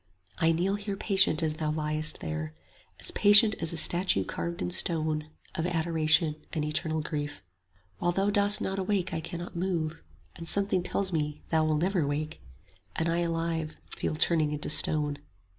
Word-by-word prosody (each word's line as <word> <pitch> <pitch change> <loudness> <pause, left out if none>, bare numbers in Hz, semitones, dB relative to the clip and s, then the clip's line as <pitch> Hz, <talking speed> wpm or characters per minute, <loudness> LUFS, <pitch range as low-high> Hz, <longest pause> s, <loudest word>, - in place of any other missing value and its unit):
I 165 - +3
kneel 185 +5 0
here 200 -1 -5
patient 190 -6 +3
as 155 -1 0
thou 155 -2 -2
liest 155 0 +1
there; 80 0 -5 0.4
As - - 0
patient 210 +2 +7
as 165 - -2
a 170 - -5
statue 175 - +3
carved 170 0 -5
in - - -3
stone, 155 -4 0 0.2
Of 165 +2 -2
adoration 160 -2 +1 0.2
and 155 -2 -2
eternal 155 +1 -2
grief. 145 - -5 0.6
While 175 - +1
thou 195 +3 0
dost 205 0 +6
not 195 0 -2
awake 190 -1 -1
I 160 - -2
cannot 170 +2 -7
move; 170 -3 -1
55 165 - -18 0.4
And 165 - -8
something 200 -2 +1
tells 190 +1 -1
me 150 -2 -3
thou 160 -1 +2
wilt 155 -1 0
never 180 -5 0
wake, 150 +2 -4 0.5
And 165 +1 -1
I 170 +1 0
alive 165 -2 -2 0.2
feel - - -3
turning 155 -1 +1
into 150 0 -2
stone. 150 -2 +2
165 Hz, 175 wpm, -28 LUFS, 155-180 Hz, 0.6 s, patient